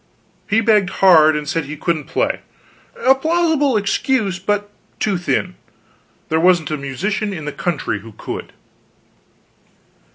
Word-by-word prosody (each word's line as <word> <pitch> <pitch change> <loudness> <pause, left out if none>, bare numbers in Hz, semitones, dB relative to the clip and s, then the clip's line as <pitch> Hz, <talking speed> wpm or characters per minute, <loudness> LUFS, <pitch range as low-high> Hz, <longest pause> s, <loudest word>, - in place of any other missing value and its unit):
He 220 +2 +3
begged 210 -4 +3 0.2
hard, 155 -4 +7
and 150 -1 -3
said 165 0 -1
he 150 +2 -7
couldn't 160 -1 -1
play - - -1 0.7
a 265 - +7
plausible 315 -3 +1
excuse, 205 -1 0
but 205 +1 -2 0.3
too 205 -2 0
thin; 180 +1 -1 0.8
there 160 - +2
wasn't 175 -2 +3
a - - 0
musician 195 - -3
in 155 -5 -6
the 150 - -3
country 150 - -2
that 110 +1 -14
could. - - -6
185 Hz, 135 wpm, -19 LUFS, 155-215 Hz, 0.8 s, hard